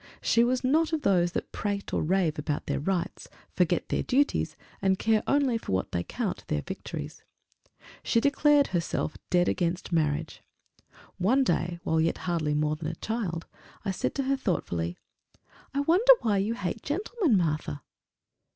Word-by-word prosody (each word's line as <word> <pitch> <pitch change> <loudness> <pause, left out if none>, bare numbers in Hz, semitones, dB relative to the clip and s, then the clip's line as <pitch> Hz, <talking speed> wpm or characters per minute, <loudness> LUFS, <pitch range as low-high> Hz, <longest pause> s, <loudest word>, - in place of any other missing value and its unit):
She 235 - +3
was 250 +2 +1
not 315 +5 +2
of 310 - -1
those 175 -3 +3
that - - -3
prate 200 -1 -3
or - - +1
rave 170 -2 +1
about 150 0 -2
their - - -1
rights, 180 +3 -2 0.2
forget - - +1
their - - 0
duties, 280 +3 +1 0.3
and 190 -1 +2
care 220 +1 +2
only 275 -5 +2
for 95 - -4
what 95 - -1
they 85 - 0
count - - -3
their 75 - -1
victories. 70 - -7 0.8
She 230 - +2
declared 285 +2 +4
herself 170 -3 -1
dead 180 -1 +3
against 175 +1 -1
marriage. 155 -1 0 0.8
One 245 +9 +3
day, 175 -5 0
while 160 0 +1
yet 165 - +1
hardly 160 -4 0
more 150 0 +1
than 155 0 -5
a 165 - -3
child, 190 -6 -3 0.4
I 195 - 0
said 190 - -2
to 275 - 0
her 270 +1 +1
thoughtfully, 85 - -2 0.7
"I 280 - 0
wonder 370 +12 +6
why 210 -3 +2
you 215 +4 0
hate 200 +1 -3
gentlemen, 355 - +1
Martha!" 155 - -1
190 Hz, 165 wpm, -28 LUFS, 160-260 Hz, 0.8 s, wonder